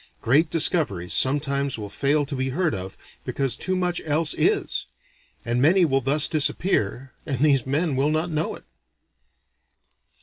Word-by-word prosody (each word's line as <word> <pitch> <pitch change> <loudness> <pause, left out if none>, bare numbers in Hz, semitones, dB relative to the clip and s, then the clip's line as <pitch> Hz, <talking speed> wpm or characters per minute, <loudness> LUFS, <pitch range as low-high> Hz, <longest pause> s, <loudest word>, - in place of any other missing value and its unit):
Great 150 +7 +2
discoveries 150 - +1
sometimes 140 0 0
will 105 -2 -6
fail 145 +7 0
to 140 0 -6
be 130 0 -2
heard 170 +5 -1
of, 95 -1 -7 0.3
because 135 -3 0
too 185 - -2
much 180 -1 -1
else 155 +1 +1
is; - - 0 0.6
and 120 +1 -1
many 175 +5 +4
will 135 -3 +1
thus 140 +4 +2
disappear, 135 - 0
and 135 -4 -4
these 135 -4 +2
men 145 +2 0
will 135 +3 +1
not 160 +3 -1
know 155 0 -2
it." - - -13
140 Hz, 155 wpm, -23 LUFS, 130-160 Hz, 0.6 s, many